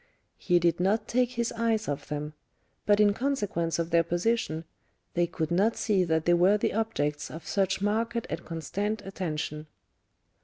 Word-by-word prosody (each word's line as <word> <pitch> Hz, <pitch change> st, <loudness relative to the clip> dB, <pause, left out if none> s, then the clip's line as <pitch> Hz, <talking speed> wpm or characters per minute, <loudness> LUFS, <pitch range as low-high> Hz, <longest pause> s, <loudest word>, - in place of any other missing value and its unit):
He 175 Hz, -, +3 dB
did 170 Hz, -1 st, +2 dB
not 210 Hz, +4 st, +1 dB
take 250 Hz, 0 st, +1 dB
his 235 Hz, -1 st, -1 dB
eyes 225 Hz, -1 st, 0 dB
off 145 Hz, -1 st, -3 dB
them; 150 Hz, 0 st, -4 dB, 0.5 s
but 205 Hz, 0 st, +5 dB
in 205 Hz, -1 st, +5 dB
consequence 205 Hz, -10 st, -1 dB
of 170 Hz, 0 st, -2 dB
their 170 Hz, 0 st, +5 dB
position, 175 Hz, -1 st, -1 dB, 0.5 s
they 175 Hz, 0 st, +2 dB
could 160 Hz, -1 st, -3 dB
not 200 Hz, +6 st, +2 dB
see 200 Hz, -4 st, +2 dB
that 160 Hz, -1 st, 0 dB
they 175 Hz, -, +4 dB
were 180 Hz, +4 st, +5 dB
the -, -, 0 dB
objects 150 Hz, -10 st, -1 dB
of 160 Hz, -, -9 dB
such 195 Hz, -1 st, 0 dB
marked 230 Hz, +3 st, 0 dB
and -, -, -5 dB
constant 200 Hz, +6 st, -3 dB
attention. 155 Hz, -5 st, -4 dB
190 Hz, 165 wpm, -28 LUFS, 165-220 Hz, 0.5 s, but